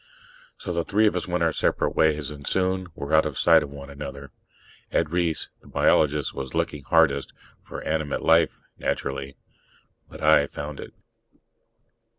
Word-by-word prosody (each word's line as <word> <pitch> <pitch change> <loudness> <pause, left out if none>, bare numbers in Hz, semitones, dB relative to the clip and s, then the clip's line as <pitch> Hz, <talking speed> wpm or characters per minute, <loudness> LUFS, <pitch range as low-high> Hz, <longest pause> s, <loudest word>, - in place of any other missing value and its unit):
So 90 - -5
the 85 0 0
three 105 +6 +2
of 105 - +2
us 90 - -2
went 90 -1 0
our 80 -1 +2
separate - - 0
ways, 75 -2 +2
and 70 -1 -9
soon 95 0 0
were 70 +2 -5
out 80 0 +5
of 75 - -6
sight 80 -1 +6
of 75 - -5
one 70 0 -10
another. 70 0 -8 0.6
Ed 80 -2 0
Reiss, 85 -2 -1
the - - -19
biologist, 75 -1 +2
was 65 -2 -6
looking 75 - -1
hardest - - +2 0.3
for - - -8
animate 75 -2 -2
life, 80 0 +3 0.2
naturally. 70 0 -3 0.7
But - - -11
I 75 -2 +5
found 75 0 -7
it. - - -10
75 Hz, 165 wpm, -25 LUFS, 70-85 Hz, 0.7 s, sight